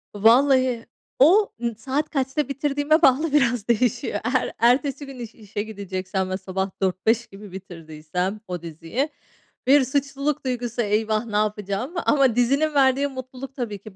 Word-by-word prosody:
Vallahi 250 +2 +4 0.3
o, 375 +10 +6
ımm, 235 -2 -2
saat 275 +7 -2
kaçta 275 +1 -1
bitirdiğime 290 +3 +1
bağlı 290 +1 +3
biraz 245 -6 +2
değişiyor. 235 -3 0 0.2
Eğer 255 - +1
ertesi 270 +4 +2
gün 270 -2 -10
iş 230 -2 -8
işe 205 -2 -5
gideceksem 190 -3 -4
ve 185 - -2
sabah 190 0 -3
04.00-05.00 215 +5 +1
gibi 200 0 -12
bitirdiysem 180 +1 -5
o 180 -2 -5
diziyi, 170 - -3 0.6
bir 275 0 +6
suçluluk 275 +2 -2
duygusu, 245 -2 -2
"Eyvah, 215 +1 0
ne 215 -3 -6
yapacağım?" 210 - -1
Ama 270 -5 +3
dizinin 275 +6 +2
verdiği 275 0 +3
mutluluk 260 0 -8
tabii 235 -6 -4
ki 200 0 -13
240 Hz, 145 wpm, -23 LUFS, 205-275 Hz, 0.6 s, o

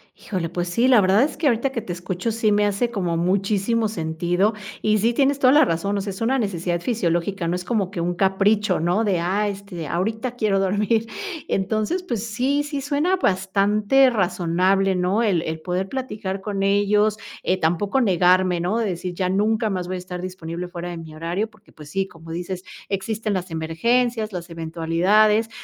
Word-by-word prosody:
Híjole, 180 -5 -4
pues 175 0 -3
sí, 235 +8 +2
la 250 -4 +6
verdad 195 +6 +4
es 300 - -2
que 310 - +1
ahorita 240 +2 +2
que 230 - -3
te 180 - -5
escucho 180 +5 -3
sí 220 -1 +1
me 205 0 +3
hace 205 +4 0
como 180 -7 -1
muchísimo 200 +5 +1
sentido. 175 +2 0 0.3
Y 215 0 +2
sí 230 +4 +2
tienes 275 +2 +2
toda 255 -1 +5
la 300 0 +6
razón, 200 +2 -1
o - - -1
sea, 200 0 -4
es 190 - -9
una 260 +4 +2
necesidad 175 -5 -1
fisiológica, 175 -4 -1
no 175 - 0
es 180 - -4
como 200 -2 -1
que 175 - -3
un 175 +1 -1
capricho, 195 +1 +2
¿no?, 175 +7 +1
de: 190 -4 +1
"Ah, 195 +5 0
este, 195 -5 -6
ahorita 220 - -2
quiero 210 -4 +1
dormir". 210 +4 +1 0.4
Entonces, 215 - -1
pues, 235 - -3
sí 260 +6 0
sí, 290 -1 -4
suena 290 +6 +1
bastante 205 - +3
razonable, 185 -1 +1
¿no?, 185 +6 +1
el 190 -7 +2
el 160 0 -5
poder 185 +2 -2
platicar 210 -7 -4
con 195 -1 -3
ellos, 205 +2 +2 0.3
eh, 185 - +1
tampoco 175 +10 +1
negarme, 185 -3 +3
¿no?, 180 +6 0
decir: 180 -5 -2
"Ya 180 +1 -1
nunca 215 +3 +1
más 185 -3 -3
voy 185 - -3
a - - -4
estar 180 0 -7
disponible 180 -1 -5
fuera 175 0 -6
de 175 - -6
mi 160 -1 -9
horario", 175 +7 -2
porque, 215 - -23
pues 150 -1 -13
sí, 195 +4 -1
como 165 -2 -12
dices, 180 +2 -5 0.3
existen 210 +2 -2
las 185 -1 -3
emergencias, 220 +8 0
las 175 -1 -6
eventualidades, 175 +7 +2
195 Hz, 190 wpm, -22 LUFS, 175-220 Hz, 0.4 s, la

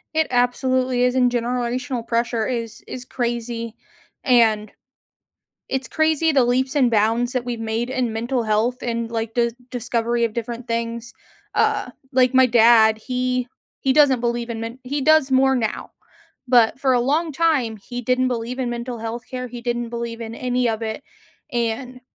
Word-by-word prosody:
It 315 0 +2
absolutely 255 0 +1
is, 250 0 +2
and 250 -1 +3
generational 245 +1 -2
pressure 235 -1 0
is 230 -2 -4
is 250 -1 -7
crazy. 235 -2 -3 0.5
And 220 -5 +3 1.0
it's 265 0 -2
crazy 315 0 +2
the 270 -4 +4
leaps 255 +2 +1
and 260 -5 +3
bounds 230 +3 +2
that 255 -2 -1
we've 240 -2 -4
made 225 +2 -2
in 255 -3 -1
mental 235 +3 -1
health, 220 +4 0
and 235 -1 -2
like 225 -1 -3
the 235 -1 +1 0.2
discovery 235 -1 -1
of 230 - -1
different 235 +1 -5
things. 230 0 -3 0.4
Uh, - - +1 0.2
like 255 0 +3
my 260 0 +7
dad, 225 -2 +5
he 250 +1 -1 0.3
he 265 - +2
doesn't 270 -3 +5
believe 235 0 -1
in 230 -1 -4
men 230 +2 -6
he 280 +2 -2
does 310 -2 +4
more 265 0 +4
now, 225 -4 -2 0.6
but 240 -1 +4
for 265 -2 +3
a 245 - +3
long 305 +7 +1
time, 275 -8 +1
he 245 +4 -7
didn't 255 +2 +1
believe 245 +1 -3
in 250 -2 -1
mental 240 0 -5
health 230 +1 -5
care. 255 -1 -4
He 240 0 -8
didn't 240 -1 -2
believe 235 -1 -5
in 225 0 -6
any 250 0 0
of 225 0 -2
it, 220 +4 -4 0.5
and 245 +2 -2
240 Hz, 170 wpm, -22 LUFS, 230-255 Hz, 1.0 s, my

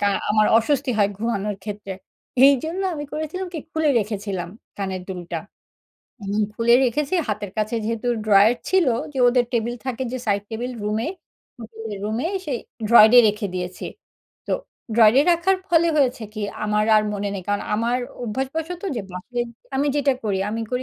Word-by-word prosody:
কা 205 - +3 0.2
আমার 215 0 +4
অস্বস্তি 270 +2 0
হয় 200 -1 +4
ঘুমানোর 210 -3 -2
ক্ষেত্রে। 205 -2 -6 0.5
এইজন্য 315 +7 +2
আমি 295 -1 -5
করেছিলাম 315 +5 -4
কি, 325 - -4
খুলে 315 -1 +1
রেখেছিলাম 200 -4 -3 0.3
কানের 190 -2 -3
দুলটা। 175 -2 -5 0.9
এমন 205 +2 0
খুলে 235 +1 +4
রেখেছি 285 +7 0
হাতের 210 -2 -3
কাছে 215 +2 -1
যেহেতু 230 +2 -2 0.2
ড্রয়ার 205 +2 +6 0.2
ছিল, 375 -4 +3 0.3
যে 265 - -5
ওদের 245 0 +3
টেবিল 235 +1 0
থাকে 260 0 -2
যে 255 - -2
সাইড 200 -1 +1
টেবিল, 240 +3 -3
রুমে 215 +6 -1 0.5
হোটেলের 225 -2 -7
রুমে, 220 +8 -1 0.2
সেই 260 -5 -2 0.3
ড্রয়ারে 235 +1 +8
রেখে 210 0 -2
দিয়েছি। 180 0 -4 0.6
তো - - -2 0.4
ড্রয়ারে 230 +4 +6
রাখার 365 +3 +2
ফলে 335 0 +4
হয়েছে 255 -5 +2
কি, 215 - -4 0.2
আমার 210 0 +1
আর 210 - +4
মনে 205 0 -2
নেই 190 - -5
কারণ, 205 0 0
আমার 235 +3 +1 0.2
অভ্যাসবশত 300 - -3
যে 215 - -2
বাসে 240 +7 -4 0.4
আমি 280 +2 +1
যেটা 280 -1 +3
করি 200 -2 0
আমি 225 +1 -3
করি 250 +1 -1
230 Hz, 160 wpm, -22 LUFS, 210-265 Hz, 0.9 s, ড্রয়ারে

